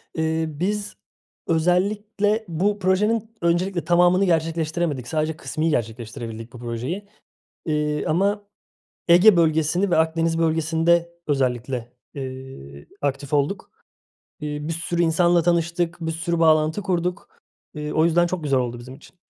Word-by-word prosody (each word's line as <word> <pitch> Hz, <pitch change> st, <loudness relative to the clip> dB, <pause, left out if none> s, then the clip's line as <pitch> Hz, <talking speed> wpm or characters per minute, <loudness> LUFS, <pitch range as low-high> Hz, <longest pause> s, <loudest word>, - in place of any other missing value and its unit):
Eee, 160 Hz, 0 st, 0 dB
biz 200 Hz, +7 st, -3 dB, 0.5 s
özellikle 205 Hz, +6 st, +1 dB
bu 195 Hz, +5 st, 0 dB
projenin 210 Hz, +4 st, +1 dB
öncelikle 175 Hz, +1 st, 0 dB
tamamını 180 Hz, +2 st, +4 dB
gerçekleştiremedik. 160 Hz, -5 st, -1 dB
Sadece 155 Hz, +1 st, -1 dB
kısmi 160 Hz, +1 st, -2 dB
gerçekleştirebildik 115 Hz, -2 st, -4 dB
bu 125 Hz, -, -10 dB
projeyi, 125 Hz, -, -4 dB, 0.6 s
eee, 150 Hz, -1 st, -1 dB
ama 200 Hz, +5 st, 0 dB, 0.6 s
Ege 180 Hz, +3 st, +7 dB
bölgesini 165 Hz, +3 st, +2 dB
ve -, -, +3 dB
Akdeniz 165 Hz, +1 st, +1 dB
bölgesinde 165 Hz, +1 st, +2 dB
özellikle, 125 Hz, -3 st, -1 dB, 0.2 s
eee, 130 Hz, -, -8 dB, 0.2 s
aktif 140 Hz, 0 st, -2 dB
olduk. 145 Hz, +7 st, 0 dB, 0.7 s
Eee, 150 Hz, -1 st, -4 dB
bir -, -, -1 dB
sürü 170 Hz, +1 st, -1 dB
insanla 170 Hz, +1 st, +3 dB
tanıştık. 170 Hz, 0 st, 0 dB
Bir 160 Hz, -1 st, -2 dB
sürü 165 Hz, +1 st, -2 dB
bağlantı 155 Hz, +3 st, +3 dB
kurduk. 180 Hz, -2 st, -2 dB, 0.5 s
Eee, 150 Hz, -1 st, -4 dB
o 155 Hz, -, +3 dB
yüzden 170 Hz, +1 st, +3 dB
çok 175 Hz, -1 st, -3 dB
güzel 140 Hz, -2 st, +2 dB
oldu 120 Hz, -1 st, -3 dB
bizim 125 Hz, +2 st, -10 dB
için. 145 Hz, +6 st, -17 dB
165 Hz, 125 wpm, -23 LUFS, 145-175 Hz, 0.7 s, Ege